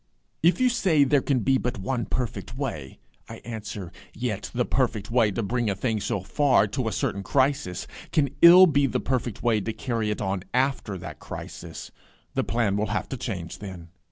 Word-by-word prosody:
If 170 +3 +4
you 255 - +4
say 185 -11 +3
There 140 0 +3
can 130 -3 +1
be 135 +4 +3
but 125 0 -2
one 120 +3 -2
perfect 115 -1 -4
way, 80 - -4 0.3
I - - -7
answer, 110 -5 -6 0.2
Yet 115 -4 -3
the 125 0 0
perfect 115 -5 -1
way 115 -3 +4
to 105 +3 -2
bring 120 +2 0
a 100 - 0
thing 110 +2 -1
so 100 -2 -1
far, 130 - +3
to 130 +1 -2
a - - 0
certain 100 0 -1
crisis, 130 -5 0 0.3
can 140 -4 +2
ill 180 +2 +10
be 145 -5 +3
the - - -1
perfect 125 -4 -2
way 115 -3 +2
to 110 +3 -3
carry 115 -4 -2
it 105 - -2
on 95 -2 -1
after 130 -6 0
that 85 - -8
crisis: - - -8 0.4
the - - 0
plan 115 -4 0
will 105 +1 0
have - - -2
to - - -3
change 95 -10 -5
then. 95 -5 -8
120 Hz, 195 wpm, -26 LUFS, 100-135 Hz, 0.4 s, ill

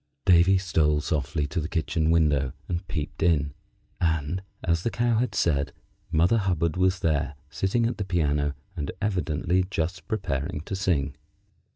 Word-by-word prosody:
Davy 90 +2 +6
stole 80 -5 +2
softly 75 -1 -1
to 80 +4 -2
the 80 - -4
kitchen 80 -1 0
window 75 -6 +3
and 90 +1 -3
peeped 75 -4 -4
in, 75 -4 +2 0.5
and, 80 +1 0 0.2
as 85 -2 +1
the 115 - 0
Cow 120 -1 +1
had 120 -4 -1
said, 70 -6 +1 0.4
Mother 85 +9 +4
Hubbard 85 -5 0
was 95 0 +2
there, 75 -3 0 0.2
sitting 95 +10 +1
at 115 - -2
the - - 0
piano, 75 -6 0 0.2
and 75 -5 -3
evidently 90 -3 0
just 85 -2 -2
preparing 75 - -2
to 95 - -5
sing. 80 -7 0
85 Hz, 155 wpm, -26 LUFS, 75-95 Hz, 0.5 s, Davy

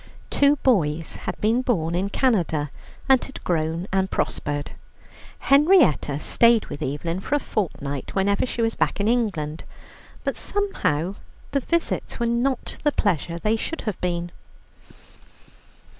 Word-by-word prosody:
Two 285 +1 +4
boys 165 - +1
had - - -6
been 225 +4 +2
born 170 -11 0
in 185 +3 0
Canada, 170 - +1 0.4
and 265 -2 +5
had 270 - -9
grown 165 +1 -1
and 190 0 +1
prospered. 145 -4 -2 0.7
Henrietta 275 - +4
stayed 230 +8 +4
with 145 - -8
Evelyn 160 +5 -2
for 265 - -1
a - - +2
fortnight 145 - -3
whenever 200 +1 +2
she 235 - -2
was 225 0 +1
back - - 0
in 200 - +1
England, 195 -11 0 0.6
but - - -1
somehow 195 - -1 0.4
the 280 - +2
visits 335 +1 -1
were 235 - +1
not 240 +2 -1
the 295 - +3
pleasure 175 - 0
they 215 +6 +1
should 315 +8 -4
have 215 -4 -4
been. 175 -1 -2
200 Hz, 140 wpm, -24 LUFS, 160-245 Hz, 0.7 s, and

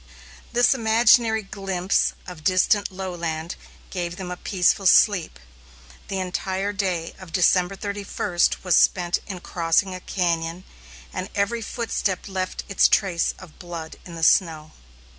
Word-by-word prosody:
This 245 +1 +4
imaginary 225 -1 +4
glimpse 195 -2 -1
of 175 -4 -10
distant 185 +4 +2
lowland 170 -3 -4 0.4
gave 175 -2 -3
them 180 -1 -6
a - - -3
peaceful 190 +1 +1
sleep. 180 - +4 0.7
The 195 - -3
entire 190 +2 -2
day 185 -5 -2
of 185 -3 -11
December 180 +2 +2
31 200 -3 -5 0.2
was 180 -2 +3
spent 175 -1 +3
in 185 -3 -6
crossing 175 +3 0
a 185 - -6
cañon, 170 -1 -2 0.5
and 185 +2 -4
every 220 +3 0
footstep 215 -5 -2
left 185 -1 -4
its 200 - +4
trace 180 -4 +1
of 185 -4 -14
blood 170 -3 -8
in 170 - -10
the 165 - -6
snow. 160 -3 +3
185 Hz, 135 wpm, -23 LUFS, 175-200 Hz, 0.7 s, This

